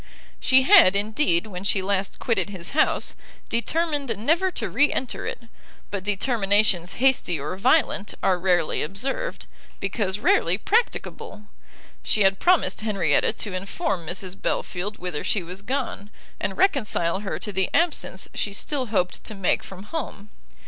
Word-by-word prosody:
She 260 0 +4
had, 305 - +7
indeed, 205 - +1
when 190 -3 -7
she 195 -1 +1
last 195 0 -1
quitted 205 -5 0
his 185 -3 -4
house, 305 - +1 0.4
determined 290 +3 -1
never 325 - +2
to - - -4
re 290 +1 +3
enter 255 - -3
it; - - -5 0.5
but 200 -2 -3
determinations 205 -3 +1
hasty 250 - +2
or 150 +6 -4
violent, 235 -2 +2
are 185 -2 +2
rarely 175 -3 +1
observed, 260 - -4 0.3
because 195 -1 -1
rarely 180 -3 +2
practicable; 425 - -1 0.6
she 210 - +2
had 195 0 +3
promised 360 -9 +2
Henrietta 210 -3 +2
to 205 - -5
inform 185 - -3
Mrs 185 +2 -4
Belfield 200 +3 -2
whither 180 -4 -3
she 200 - 0
was 180 +3 -7
gone, 210 -4 -3 0.3
and - - -3
reconcile 215 - +1
her 205 -1 -4
to 210 - -5
the 190 -1 0
absence 325 - 0
she 200 - -2
still 260 +5 -2
hoped 185 -5 -1
to 215 - -4
make 195 -3 +1
from 190 0 -10
home. 210 -5 -6
205 Hz, 150 wpm, -24 LUFS, 190-260 Hz, 0.6 s, had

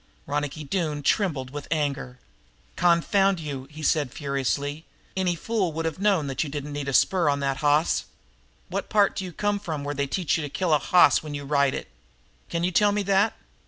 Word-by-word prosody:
Ronicky 145 +1 -3
Doone 150 -2 -2
trembled 140 -7 0
with 145 0 -7
anger. 140 -5 -2 0.6
"Confound 180 +2 +3
you!" 140 -4 -6
he 155 +1 -10
said 145 -4 +1
furiously. 140 +2 -2 0.3
"Any 185 -2 +1
fool 195 0 -1
would 165 +1 -3
have 165 +1 -3
known 195 -6 +2
that 135 +1 -1
you 150 - -5
didn't 145 0 -5
need 145 -1 -4
a - - -1
spur 175 +2 +3
on 140 0 +1
that 135 -1 0
hoss! 150 +2 +2 0.6
What - - -4
part 205 -2 +3
d'you 185 -2 -4
come 205 +4 -1
from 155 -6 -4
where 145 +1 -3
they 140 0 -1
teach 170 +1 0
you - - -3
to 145 - -4
kill 175 +2 0
a 150 - +4
hoss 180 +3 +5
when 150 -2 -6
you 145 0 -6
ride 140 -1 +2
it? - - -5 0.6
Can 170 0 -2
you 180 - +1
tell 205 +3 +4
me 205 0 0
that?" 200 +2 +2
155 Hz, 200 wpm, -25 LUFS, 145-180 Hz, 0.6 s, hoss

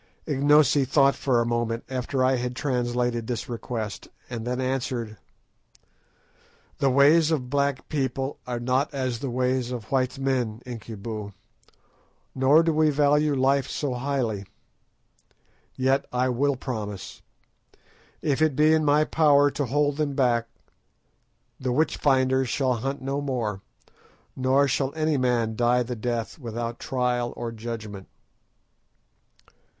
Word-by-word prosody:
Ignosi 145 0 +4
thought 140 +1 +4
for 130 -4 +1
a 115 - +1
moment 120 0 -1
after 130 +1 -1
I 130 0 +3
had 125 0 -3
translated 120 -4 -1
this 120 0 -3
request, 115 -4 -5 0.2
and 115 -1 -5
then 125 +1 -2
answered— 125 -4 -2 1.6
"The 135 - +3
ways 145 +4 +5
of 130 -6 -1
black 140 -1 0
people 135 -1 -2
are 120 -1 -3
not 130 +4 0
as 130 -3 -2
the 135 - -3
ways 125 0 0
of 120 -4 -6
white 130 -1 0
men, 125 -4 -1
Incubu, 110 -3 -7 1.0
nor 140 +5 +5
do 165 -1 +1
we 155 0 +3
value 150 0 +3
life 135 0 +2
so 140 -4 -2
highly. 120 -6 -2 1.3
Yet 130 +1 +1
I 125 +1 +1
will 140 +3 +1
promise. 105 -7 -6 1.0
If 145 0 0
it 155 -3 +3
be 155 +2 +4
in 160 -1 +3
my 150 +1 +4
power 145 -2 +4
to 145 - -2
hold 145 +2 +1
them 145 -3 -1
back, 120 -3 +2 1.1
the 130 -1 -2
witch 150 +5 +1
finders 130 -2 +2
shall 130 -1 +1
hunt 135 +4 -4
no 135 +2 -2
more, 120 -8 -2 0.7
nor 135 +2 +3
shall 135 +1 -1
any 155 -1 +1
man 120 -3 +1
die 120 +2 +2
the 125 +1 -5
death 120 +3 -3
without 115 -1 -5
trial 125 -2 -1
or 120 -1 -4
judgment." 110 -4 -7
130 Hz, 135 wpm, -25 LUFS, 120-140 Hz, 1.6 s, ways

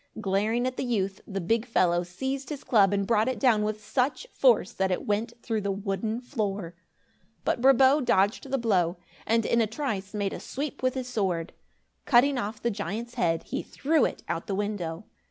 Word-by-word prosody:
Glaring 215 +4 0
at 255 0 -2
the - - -1
youth, 200 -6 -1
the 195 -1 -3
big 225 +6 +1
fellow 180 -8 +2
seized 265 +11 -4
his 295 -3 -6
club 210 -7 +4
and 200 -1 +1
brought 220 +1 +2
it 260 -2 -1
down 225 -3 +4
with 215 0 -3
such 265 - 0
force - - +4
that 190 0 0
it 180 - -2
went 215 +3 -1
through 225 -3 -1
the 200 - -2
wooden 195 +3 -2
floor. 205 - -3 0.7
But - - 0
Brabo 270 +2 +6
dodged 205 +4 +2
the 270 - +1
blow 185 -7 +1 0.3
and, 230 0 +2
in 235 - +3
a 220 - +2
trice, 215 -5 -4
made 200 -2 -1
a - - -5
sweep 285 +1 -5
with 255 0 +1
his 255 -1 -3
sword. 190 -8 -1 0.5
Cutting 260 +1 +4
off 215 -1 -4
the 235 - 0
giant's 215 +4 -4
head, 165 -9 0
he - - -3
threw 315 +3 +1
it - - -4
out - - -3
the 200 - -1
window. 200 -3 -3
215 Hz, 195 wpm, -27 LUFS, 195-250 Hz, 0.7 s, Brabo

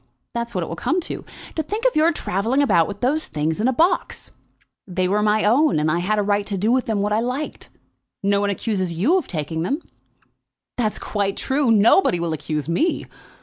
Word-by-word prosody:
That's 235 -1 -4
what 180 - 0
it - - -5
will 165 - -5
come 345 - 0
to. - - -5 0.3
To 320 - 0
think 420 +10 -4
of - - +3
your 315 +2 +4
travelling 240 - 0
about 170 -12 +3
with 200 -1 -7
those 295 +6 0
things 155 +5 -2
in 230 - +2
a - - +3
box!" 340 +7 0 0.6
"They 185 0 0
were 205 +3 +1
my 210 0 +2
own, 255 - +3
and 155 +1 +1
I 170 - +1
had 205 +5 0
a 210 - +2
right 205 0 +1
to 200 - -2
do 210 +5 +1
what 255 -1 +1
I 210 0 +1
liked 255 +6 -4
with - - -37
them. - - -35 0.4
Nobody 200 0 +2
accuses 190 -5 -2
you 280 - +3
of 330 - -8
taking 160 -1 -3
them." 240 - -1 1.0
"That's 220 -3 -1
quite 200 -2 -2
true. 275 -1 0
Nobody 220 - +4
will 170 -1 -1
accuse 150 -1 -3
me. 300 - 0
210 Hz, 210 wpm, -22 LUFS, 180-265 Hz, 1.0 s, your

